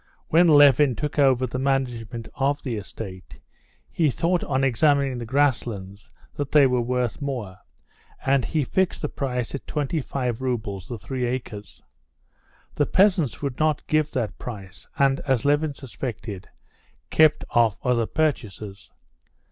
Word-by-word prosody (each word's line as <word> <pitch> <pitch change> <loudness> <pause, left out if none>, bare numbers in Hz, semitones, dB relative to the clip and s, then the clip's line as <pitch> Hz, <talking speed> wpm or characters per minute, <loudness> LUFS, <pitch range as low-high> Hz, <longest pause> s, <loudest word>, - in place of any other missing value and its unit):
When 170 +2 +5
Levin 145 -3 +6
took 150 +2 -3
over 130 -2 +4
the 125 +1 -4
management 125 -4 -2
of 140 +2 0
the 125 -4 -3
estate, 95 -2 -8 0.5
he 160 -3 +1
thought 170 +6 0
on 135 -2 0
examining 135 0 +2
the 120 - -6
grasslands 115 -7 -1 0.2
that 145 -2 -4
they 150 -2 +6
were 125 -2 +2
worth 125 +2 -1
more, 120 -10 -4 0.7
and 135 -1 +3
he 155 +2 0
fixed 190 +7 0
the 150 - -1
price 125 -3 -3
at 140 - -6
twenty 150 +1 -1
five 125 -3 -3
roubles 110 -7 -3
the 120 - -5
three 125 +3 -3
acres. 115 -4 -6 0.9
The 145 - +1
peasants 185 - +2
would 135 -3 -3
not 155 -1 +1
give 155 -1 +1
that 120 -5 -2
price, 100 -7 -9
and, 135 -2 +3
as 130 -4 0
Levin 145 0 +2
suspected, 115 -7 -7 0.6
kept 155 -1 +4
off 115 -3 +3
other 120 -3 +2
purchasers. 110 -10 -3
130 Hz, 145 wpm, -24 LUFS, 115-145 Hz, 0.9 s, Levin